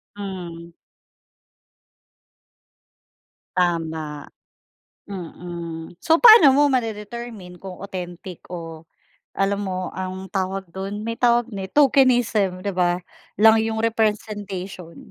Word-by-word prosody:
Hmm. 175 Hz, -4 st, -7 dB, 2.8 s
Tama. 160 Hz, -4 st, -1 dB, 0.8 s
Mm, 170 Hz, -3 st, -7 dB
so 325 Hz, 0 st, +4 dB
paano 435 Hz, -, +9 dB
mo 290 Hz, +2 st, +4 dB
ma-de-determine 225 Hz, -5 st, -4 dB
kung 190 Hz, -2 st, -8 dB
authentic 180 Hz, -1 st, -7 dB
o 165 Hz, -2 st, -7 dB, 0.5 s
alam 200 Hz, +1 st, +1 dB
mo, 185 Hz, -1 st, -3 dB
um, 185 Hz, +1 st, -5 dB
tawag 190 Hz, 0 st, -2 dB
do'n? 200 Hz, +2 st, -5 dB
May 230 Hz, -, -2 dB
tawag 240 Hz, -1 st, +3 dB
ne 190 Hz, -1 st, -4 dB
"tokenism," 240 Hz, -9 st, +3 dB
'di 200 Hz, -, 0 dB
ba, 175 Hz, -1 st, +2 dB, 0.4 s
lang 220 Hz, +1 st, +6 dB
yung 220 Hz, 0 st, -2 dB
representation? 205 Hz, -5 st, -2 dB
195 Hz, 95 wpm, -22 LUFS, 180-220 Hz, 2.8 s, paano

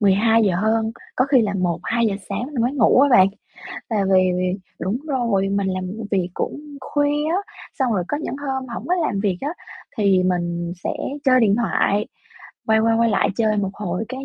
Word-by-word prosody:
mười 200 Hz, -2 st, +4 dB
hai 225 Hz, +3 st, +3 dB
giờ 190 Hz, -3 st, +2 dB
hơn, 220 Hz, +3 st, +1 dB, 0.2 s
có 255 Hz, -, +3 dB
khi 270 Hz, -3 st, +4 dB
là 205 Hz, -2 st, -1 dB
1:00-2:00 195 Hz, +5 st, 0 dB
sáng 200 Hz, +4 st, -2 dB, 0.2 s
mới 245 Hz, +3 st, +1 dB
ngủ 255 Hz, -2 st, +4 dB
á 285 Hz, -, +5 dB
bạn, 190 Hz, -6 st, +6 dB, 0.6 s
và 225 Hz, -, 0 dB, 0.2 s
vì 185 Hz, 0 st, +4 dB
vì 180 Hz, 0 st, 0 dB, 0.3 s
đúng 195 Hz, +5 st, -1 dB
rồi, 235 Hz, -9 st, 0 dB
mình 200 Hz, 0 st, 0 dB
làm 185 Hz, 0 st, -2 dB
v 210 Hz, +5 st, -6 dB
việc 185 Hz, -3 st, 0 dB
cũng -, -, -3 dB, 0.2 s
khuya 290 Hz, +2 st, 0 dB
á, 360 Hz, -, +1 dB, 0.4 s
xong 260 Hz, -4 st, +1 dB
rồi 185 Hz, -4 st, 0 dB
có 290 Hz, -, -1 dB
những 305 Hz, -, -4 dB
hôm 265 Hz, -2 st, -4 dB
hổng 235 Hz, -, -6 dB
có 360 Hz, -, +3 dB
làm 310 Hz, -, -1 dB
việc 195 Hz, -3 st, 0 dB
á, 285 Hz, -, -2 dB, 0.5 s
thì 195 Hz, -3 st, +3 dB
mình 175 Hz, -1 st, -1 dB
sẽ -, -, 0 dB, 0.3 s
chơi 255 Hz, -2 st, +5 dB
điện 205 Hz, -4 st, +4 dB
thoại, 210 Hz, -3 st, +1 dB, 0.6 s
quay 220 Hz, 0 st, +4 dB
qua 225 Hz, 0 st, +2 dB
quay 230 Hz, -1 st, +3 dB
lại 210 Hz, -, +2 dB
chơi 220 Hz, -2 st, +1 dB
một 200 Hz, -2 st, -1 dB
hồi 190 Hz, 0 st, -3 dB
cái 260 Hz, +2 st, -6 dB
220 Hz, 205 wpm, -21 LUFS, 190-255 Hz, 0.6 s, bạn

